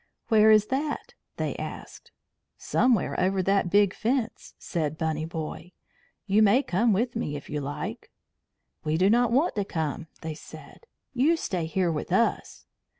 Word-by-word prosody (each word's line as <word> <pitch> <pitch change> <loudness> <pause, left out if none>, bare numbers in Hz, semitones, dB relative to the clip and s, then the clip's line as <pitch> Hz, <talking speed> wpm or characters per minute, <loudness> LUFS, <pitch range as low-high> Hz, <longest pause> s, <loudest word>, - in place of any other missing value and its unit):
"Where 220 -2 +6
is 215 -1 +6
that?" 290 +2 -3 0.2
they - - -2
asked. - - -8 0.5
"Somewhere 245 -7 +1
over 190 +1 +1
that 195 -1 +2
big 200 0 +4
fence," 235 0 -2
said 155 -3 -3
Bunny 160 -1 -1
Boy. 165 +2 -6 0.5
"You 210 +1 +3
may 220 +6 +5
come 225 +4 +1
with 235 +5 0
me 150 -11 -2
if 145 - -8
you 150 - -2
like." 140 +1 -5 0.7
"We 155 +1 0
do 190 +4 +4
not 240 0 +3
want 280 +8 +2
to 205 - +1
come," 160 -4 -3
they 160 -1 -4
said. 465 - -13 0.3
"You 290 +7 +3
stay 175 - -2
here 175 +1 0
with 155 +2 -4
us." 230 +6 0
195 Hz, 155 wpm, -26 LUFS, 160-230 Hz, 0.7 s, Where